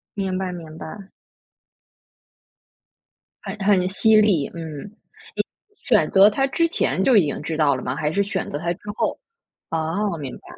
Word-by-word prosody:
明 190 -2 -2
白 185 -1 -3
明 160 -3 -9
白。 195 +5 -9 2.3
很 200 +1 -6
很 185 -3 +3
犀 220 +3 +3
利， 185 -10 +2
嗯， 160 -4 -7 0.9
你 415 - -35
选 - - +3
择 195 +2 +7
他 270 +5 +1
之 335 +5 +1
前 190 - 0
就 255 - +4
已 175 - +5
经 145 - -3
知 160 +1 -3
道 145 -3 +3
了 130 - -6
吗， - - -2
还 150 0 -1
是 200 +3 +1
选 195 -2 -3
择 145 - -3
他 170 +2 -1
之 180 - -17 0.2
后？ - - -1 0.5
啊， 165 +4 -1
明 140 -4 -6
白。 - - -24
185 Hz, 180 characters per minute, -22 LUFS, 160-205 Hz, 2.3 s, 择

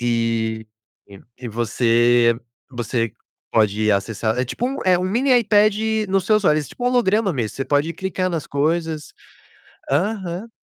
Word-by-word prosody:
E 115 -2 -1 0.7
e 125 - -7
você 120 +1 +2 0.4
você 120 -3 -2 0.4
pode 110 -1 +2
acessar 110 +3 -1
é 130 - +1
tipo 235 - -3
um 270 - -3
é 185 -1 +4
um 180 - -2
mini 240 +8 +1
iPad 210 -2 +3 0.3
no 195 0 +2
seus 210 +2 +1
olhos. 150 -3 +2
É - - -14
tipo 245 - -7
um 245 - +3
holograma 220 -5 +2
mesmo, 120 -7 -3
você 135 - -2
pode 145 +4 +1
clicar 185 +2 -2
nas 165 -4 -3
coisas. 155 +1 -1 0.8
Aham. 190 +5 -1
145 Hz, 150 wpm, -21 LUFS, 115-190 Hz, 0.8 s, é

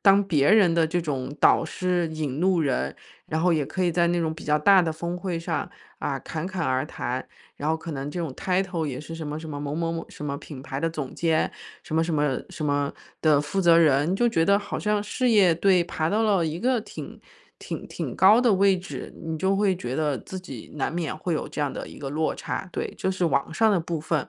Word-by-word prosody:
当 200 0 +6
别 145 -5 +3
人 200 -5 +6
的 165 -1 +3
这 175 +2 0
种 140 -2 -3
导 - - +5
师、 175 0 -1
引 150 -3 -3
路 180 0 +3
人， 125 - 0 0.3
然 160 +1 -1
后 180 -1 +4
也 150 -3 +1
可 185 - -2
以 175 - +3
在 170 0 +2
那 175 0 +1
种 160 -1 0
比 160 - -10
较 150 0 +3
大 190 +5 +6
的 165 -2 0
峰 170 +3 -4
会 180 -3 -3
上， 165 - -2 0.3
啊， - - -2
侃 160 +2 -5
侃 185 -3 -3
而 130 +2 0
谈。 125 -4 -4 0.3
然 150 - -2
后 160 - +2
可 165 +1 -7
能 140 -1 -4
这 175 - -4
种 165 -4 -2
title 180 -3 -1
也 130 -2 -4
是 165 +2 -8
什 160 -2 -5
么 150 +1 -4
什 160 - -7
么， 145 -1 -5
某 145 0 -3
某 165 0 -1
某 165 0 -4
什 150 - -9
么 140 -1 -3
品 145 -3 -10
牌 135 -1 -5
的 165 - 0
总 150 -5 -5
监， 165 -2 +1 0.3
什 - - -6
么 160 - +3
什 165 -1 -1
么 145 -3 +1
什 155 - -5
么 145 -1 0 0.3
的 150 -3 +4
负 150 +7 -2
责 170 -2 +6
人， 155 +1 +4
就 240 +4 +3
觉 165 -8 +2
得 200 +3 +5
好 205 - -4
像 210 -1 0
事 250 +4 0
业 200 -7 +5
对， 180 +1 +3
爬 160 -2 -2
到 215 +4 +1
了 195 -7 +2
一 160 +3 -3
个 250 -1 +2
挺 - - -9 0.4
挺 - - -6
挺 - - -5
高 210 +5 +6
的 240 -5 +4
位 195 0 +4
置， 180 - -7
你 160 0 -2
就 190 +4 +1
会 200 -2 +2
觉 130 -7 -4
得 150 -3 +1
自 190 - -7
己 135 -11 -9
难 145 +3 -1
免 170 -3 -2
会 170 0 -1
有 - - -3
这 - - -5
样 145 -2 0
的 - - -6
一 - - -11
个 140 - -5
落 155 +3 0
差。 190 - -5
对， - - -4
就 190 - -1
是 185 -2 -1
网 150 -1 +1
上 220 +4 +3
的 185 - +2
部 165 -1 -3
分。 155 -2 -1
165 Hz, 280 characters per minute, -25 LUFS, 150-185 Hz, 0.4 s, 当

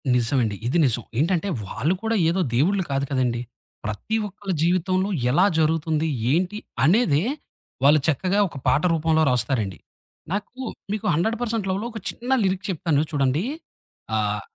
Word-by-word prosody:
నిజమండి. 120 -3 +1
ఇది 130 - +1
నిజం. 120 -2 0 0.2
ఏంటంటే 175 +5 +1 0.2
వాళ్ళు 150 - 0
కూడా 225 0 +1
ఏదో 185 +3 +1
దేవుళ్ళు 185 +9 +2
కాదు 135 0 0
కదండీ! 125 -3 0 0.4
ప్రతి 105 - -3
ఒక్కళ్ళ 200 -1 -5
జీవితంలో 185 +2 +1 0.2
ఎలా 175 +8 +4
జరుగుతుంది? 160 0 +1 0.2
ఏంటి? 180 +6 +1 0.3
అనేదే 165 - +4 0.6
వాళ్ళు 150 +2 +6
చక్కగా 185 +6 +1
ఒక 165 - -10
పాట 145 - +4
రూపంలో 160 0 +2
రాస్తారండి. 120 -6 0 0.5
నాకు 205 +3 -3 0.4
మీకు 215 +1 -3
"హండ్రెడ్ 220 +9 +1
పర్సెంట్ 225 -4 -1
లవ్‌లో" 195 +4 -1
ఒక 220 - -6
చిన్న 245 +2 -5
లిరిక్ 190 +1 0
చెప్తాను 160 -4 +1
చూడండి. 140 +2 +1 0.7
ఆహ్, 105 -1 0
165 Hz, 140 wpm, -23 LUFS, 135-190 Hz, 0.7 s, వాళ్ళు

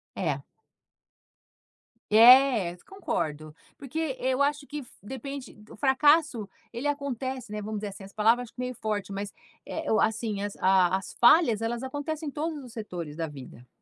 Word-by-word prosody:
É. - - -1 1.7
É, 230 -4 +7
concordo, 155 - -3 0.2
porque 280 0 -3
eu 260 +1 +1
acho 290 0 +1
que 295 +1 -6
f 250 - -11
depende 265 +3 -7
d 210 0 -16
o - - -11
fracasso, 285 -4 +3 0.2
ele 250 +5 -3
acontece, 265 -4 -3
né, 210 0 -4
vamos 215 0 -4
dizer 205 - -3
assim. 195 0 -10
As 195 - -14
palavras, 230 +4 +3
acho - - -17
que - - -16
meio 250 0 -3
forte, 210 -3 -3
mas, 200 +1 -5 0.3
eh-eh, 320 -5 -4
o 220 - +3
assim 220 -2 0
as 205 0 -4
a 190 -1 +3
as 190 - -5
falhas, 240 -4 +6
elas 235 +2 -2
acontecem 290 +3 -4
em - - -8
todos 305 -1 -4
os 245 - -11
setores 175 -9 -6
da 165 -1 -2
vida. 130 -4 -12
235 Hz, 175 wpm, -27 LUFS, 205-280 Hz, 1.7 s, É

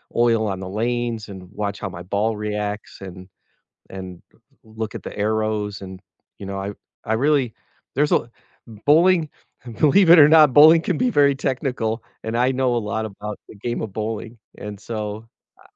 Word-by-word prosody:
oil 115 -2 +2
on 95 -2 -3
the 95 -1 -6
lanes, 115 +1 -2
and 95 -2 -9
watch 100 -1 -4
how 95 - -4
my 90 -1 -9
ball 105 +4 -1
reacts 105 -1 -4
and 95 -1 -10 0.6
and 95 -2 -8
d - - -29 0.3
look 110 0 -6
at - - -7
the - - -8
arrows, 105 -1 -1
and, 95 -1 -8 0.4
you - - -8
know, 100 0 -5
I 100 +1 -4 0.3
I 110 - +1
really 135 -1 +1 0.4
there's 150 +2 +1
a 120 - +1 0.6
bowling 165 +1 +4 0.5
believe 165 +4 +5
it 175 - +9
or 145 -1 +9
not, 155 -3 +6
bowling 160 +3 +8
can - - -1
be 250 - +2
very 140 -6 +4
technical, 125 -4 -2 0.2
and 110 +1 -2
I 125 +2 +2
know 130 -2 +1
a - - +2
lot 110 0 -3
about 105 0 -7
the - - -12
game 120 +4 -4
of 110 -4 -6
bowling, 110 +1 -4 0.2
and 105 -1 -7
so 110 0 -5 0.3
ah - - -21
110 Hz, 185 wpm, -22 LUFS, 105-130 Hz, 0.6 s, it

